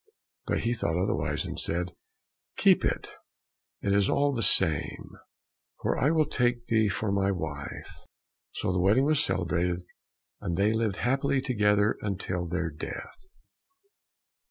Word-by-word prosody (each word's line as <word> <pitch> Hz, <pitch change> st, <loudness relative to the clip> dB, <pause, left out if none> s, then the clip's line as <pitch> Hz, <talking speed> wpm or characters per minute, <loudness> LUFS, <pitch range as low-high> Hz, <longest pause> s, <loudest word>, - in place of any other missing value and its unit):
But -, -, 0 dB
he 115 Hz, -, 0 dB
thought 85 Hz, -7 st, -1 dB
otherwise, 95 Hz, -, -1 dB
and -, -, -4 dB
said, 90 Hz, 0 st, -2 dB, 0.6 s
"Keep -, -, +4 dB
it; -, -, -2 dB, 0.7 s
it 100 Hz, -, +1 dB
is 100 Hz, -1 st, +3 dB
all 145 Hz, 0 st, +2 dB
the 120 Hz, -, -2 dB
same, 90 Hz, -7 st, +4 dB, 0.7 s
for -, -, 0 dB
I 135 Hz, -, +2 dB
will 160 Hz, -1 st, +3 dB
take 120 Hz, -2 st, 0 dB
thee 110 Hz, -3 st, +2 dB
for 100 Hz, +2 st, -2 dB
my 100 Hz, -1 st, +1 dB
true 100 Hz, -2 st, 0 dB
wife." -, -, -7 dB, 0.5 s
So -, -, -2 dB
the 90 Hz, -, 0 dB
wedding 105 Hz, +9 st, +4 dB
was 150 Hz, 0 st, +2 dB
celebrated, 90 Hz, -, -1 dB, 0.6 s
and 85 Hz, -1 st, -3 dB
they 105 Hz, +3 st, +3 dB
lived 110 Hz, -3 st, 0 dB
happily 135 Hz, +5 st, +1 dB
together 105 Hz, -5 st, +2 dB
until 90 Hz, -3 st, -3 dB
their 85 Hz, -1 st, -2 dB
death. 230 Hz, -, -8 dB
100 Hz, 145 wpm, -28 LUFS, 90-120 Hz, 0.7 s, Keep